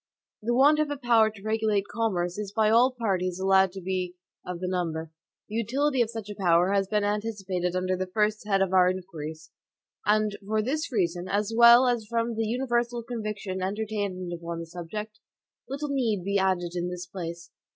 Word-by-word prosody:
The 240 +3 0
want 290 +4 +5
of 305 -1 +1
a 290 - -3
power 235 -4 +4
to 205 -2 -14
regulate 215 -2 0
commerce 190 -5 -1
is 205 -2 -4
by 215 +1 +2
all 240 +3 +6
parties 190 -7 -1
allowed 190 0 +4
to 190 - -7
be 180 -1 -3 0.3
of 180 -1 -5
the 185 - -3
number. 165 -3 -2 0.4
The - - -11
utility 260 +5 +1
of 230 - +1
such 225 -3 -6
a 210 - -5
power 180 -1 +3
has 195 -1 +2
been 210 0 +1
anticipated 200 -4 -2
under 185 0 0
the 185 0 -3
first 210 +2 0
head 195 -2 +3
of 190 -1 -2
our 180 -1 +6
inquiries; 160 -4 -6 0.5
and 210 0 +2
for 215 0 +1
this 305 +6 -2
reason, 180 -5 -1
as 205 +3 -1
well 235 +2 +8
as 235 -3 0
from 230 +1 -1
the 225 0 -1
universal 240 0 -1
conviction 215 -5 -4
entertained 200 -2 -3
upon 170 0 -5
the 165 - -5
subject, 210 +6 -7 0.5
little 285 +2 -3
need 230 -9 0
be 200 +1 +1
added 185 -2 +1
in 175 0 -2
this 180 0 -6
place. 170 -2 -7
205 Hz, 190 wpm, -27 LUFS, 180-225 Hz, 0.5 s, well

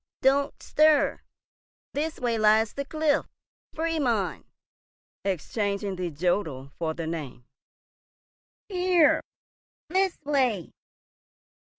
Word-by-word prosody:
"Don't 275 +1 +2
stir. 305 -1 +3 0.7
This 310 +2 -2
way 235 -2 0
lies 215 +1 +4
the 280 - -4
cliff. 310 0 +1 0.5
Fried 325 0 0
mund!" 225 -8 0 0.8
exchanging 200 +1 -2
the 180 -1 -3
jodel 155 -4 -1
for 160 -2 -1
the 165 - -4
name. 150 -7 -5 1.2
"Here!—this 365 0 0
way! 255 - +1
225 Hz, 85 wpm, -27 LUFS, -, 1.2 s, lies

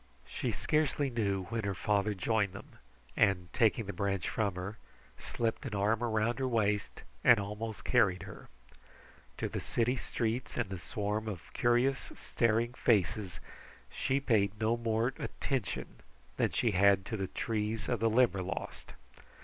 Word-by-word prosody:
She - - -2
scarcely 150 -2 0
knew 100 -5 0
when 115 0 -1
her 100 -1 -1
father 105 +2 +1
joined 100 +1 +1
them, 100 - -12 0.4
and 95 -5 +2
taking 115 -1 +3
the 100 - -5
branch 100 -3 -1
from 100 -5 -1
her, 95 +4 -6 0.4
slipped 115 +2 -2
an 110 - -4
arm 105 +3 +1
around 115 +2 +1
her 130 - 0
waist 105 -4 0 0.2
and 120 -3 +7
almost 105 0 -5
carried 105 -7 +3
her. - - -11 0.9
To - - -1
the - - -4
city 120 +2 0
streets 120 0 -2
and 115 -6 -1
the 95 - -4
swarm 105 +6 -3
of 95 -6 -7
curious, 120 +3 +2
staring 115 +1 +1
faces 95 -6 +1 0.5
she 135 +1 0
paid 105 -6 +1
no 110 +1 +2
more 115 +1 0
attention 130 -8 -3 0.4
than - - +2
she 115 - +1
had 100 0 +4
to 110 - -3
the 95 -3 -2
trees 110 +1 -2
of 120 -3 0
the 115 +1 +3
Limberlost. 100 -5 0
110 Hz, 150 wpm, -32 LUFS, 100-120 Hz, 0.9 s, and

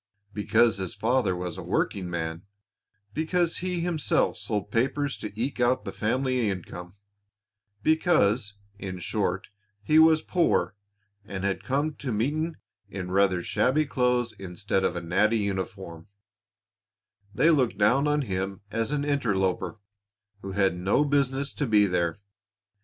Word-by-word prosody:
Because 110 +1 +3
his 95 -2 -4
father 115 -5 +1
was 90 -1 -5
a - - -5
working 90 -3 -1
man, 80 -1 -3 0.7
because 165 +2 0
he 180 -1 -2
himself 170 -3 +1
sold 105 -2 -4
papers 135 +4 0
to 105 - -5
eke 130 +2 -2
out 125 +1 +2
the - - -4
family 125 0 0
income, 90 -1 -6 0.9
because, 155 - +2 0.2
in 95 -2 -5
short, 95 0 -2 0.3
he 155 +9 +4
was 160 0 +6
poor 175 -10 +1 0.5
and 100 -2 -6
had 100 -1 -1
come 140 +7 0
to 130 - -4
meeting 150 +9 -1 0.3
in 90 -1 -5
rather 95 -2 +2
shabby 150 - +2
clothes 125 -3 +1
instead 95 +1 -2
of 90 - 0
a 85 - -3
natty 105 +7 +2
uniform, 95 -4 -4 1.3
they 165 - +5
looked 130 -9 +2
down 125 +8 +3
on 150 0 +1
him 95 -3 -3
as 115 +1 -1
an 145 -1 -1
interloper 105 -9 0 0.6
who 95 -1 -6
had 95 -2 +2
no 95 +11 +2
business 140 -1 0
to 145 - -2
be 105 -2 +5
there. 85 -3 0
110 Hz, 140 wpm, -27 LUFS, 95-140 Hz, 1.3 s, was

